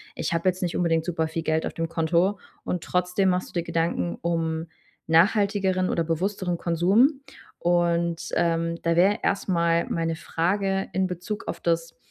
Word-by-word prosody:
ich - - -2
habe 165 +2 0
jetzt 185 +1 -4
nicht 175 - -2
unbedingt 165 -2 +1
super 160 -2 -1
viel 165 0 -4
Geld 160 0 0
auf - - -4
dem 165 0 -3
Konto“, 170 +4 +1 0.2
und 180 - -3
trotzdem 180 +2 +1
machst 180 0 -1
du - - -18
dir 170 - -1
Gedanken 165 - -1
um 165 -1 -1 0.4
nachhaltigeren 190 +2 +3
oder 165 - +1
bewussteren 180 +2 -1
Konsum. 195 - +3 0.4
Und, 170 -1 +1
ähm, 165 0 +1
da 165 0 +2
wäre 195 +5 +4
erst 200 - 0
mal 170 -1 +2
meine 165 -1 -1
Frage 195 +4 -1
in 190 0 +1
Bezug 180 +5 -5
auf - - -4
das 165 -1 -1
170 Hz, 170 wpm, -25 LUFS, 165-185 Hz, 0.4 s, wäre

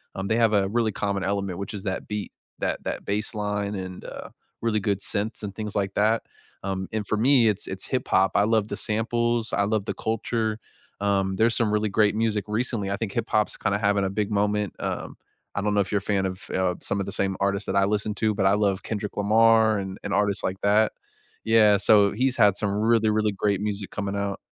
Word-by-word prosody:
um, 95 - -3
they 110 - +1
have 115 -2 +3
a 100 -1 +3
really 115 +1 +1
common 100 -1 -2
element, 100 -2 -2
which 100 +2 -5
is 100 - -6
that 95 -1 -3
beat, 105 -2 -4 0.3
that - - -2
that - - -4
bass 105 +3 -2
line 105 0 -2
and, 95 -1 -6
uh, - - -8 0.3
really 110 -2 +1
good 100 -1 -1
synths 105 +3 -2
and 100 -1 -5
things 105 -1 -5
like 100 -2 -1
that, 110 +2 +2 0.4
um, 95 -1 -3
and 110 -1 -2
for 110 - -1
me 125 0 +5
it's 105 - -2
it's - - -5
hip-hop, 95 +1 +1
I 100 - +3
love 110 -2 +2
the - - -3
samples, 115 +1 -1
I 100 - +2
love 105 -1 0
the - - -2
culture, 110 0 -2 0.4
um, 95 -1 +1
there's 115 +3 +3
some 115 -3 +1
really 105 0 +1
great 105 0 +2
music 110 -3 0
recently, 110 -2 -1
I 100 - -1
think 110 -2 -3
hip-hop's 105 0 0
kinda 100 -1 0
having 100 -1 +1
a 95 - 0
big 105 +1 -2
moment, 105 -1 0
um, - - -4 0.4
I 100 - 0
don't 105 0 0
know 100 - +3
if 100 - -4
you're 105 - +2
a 100 - -1
fan 100 -1 0
of, 95 +2 -6
eh, - - +1
uh, 90 -1 +1
some 100 - -2
of 100 - -2
the - - -4
same 95 -1 0
artists 100 +1 0
that - - -2
I 100 - +4
listen 105 +1 -1
to, 110 -1 0
but 95 -2 0
I 95 - +5
love 100 -2 +1
Kendrick 105 -2 -4
Lamar 110 +1 +4
and 95 0 -5
and 100 - -3
artists 100 -1 +1
like 95 +1 -3
that. 105 +2 +3 0.5
Yeah, 110 -2 +5
so 100 0 +5
he's 130 +3 0
had 105 -4 +5
some 105 - -1
really, 110 +2 +2
really 105 0 +1
great 100 0 0
music 105 -1 -3
coming 100 -1 -3
out. 100 -1 -2
105 Hz, 230 wpm, -25 LUFS, 100-110 Hz, 0.5 s, me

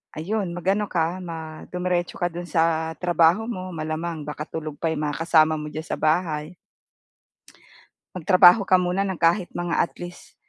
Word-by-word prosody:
ayun 190 +3 -2
mag-ano 195 +4 0
ka, 170 +1 0
ma 160 -2 -7
dumiretso 180 -1 -1
ka 175 - +1
do'n 175 +1 -7
sa 160 0 +1
trabaho 175 +4 +3
mo 185 -5 -5
malamang 160 +1 -4
baka 150 0 -4
tulog 155 -2 -6
pa 165 - 0
'yong 155 -1 -3
mga - - -5
kasama 160 -2 +4
mo 150 0 -5
diyan 155 +1 -6
sa - - -3
bahay. 155 0 0 1.6
Magtrabaho 185 +3 +6
ka 185 - +6
muna 180 +2 0
ng 190 -2 -3
kahit 175 +2 +2
mga 175 -1 -2
at - - +1
least 175 0 -10
170 Hz, 165 wpm, -24 LUFS, 160-180 Hz, 1.6 s, Magtrabaho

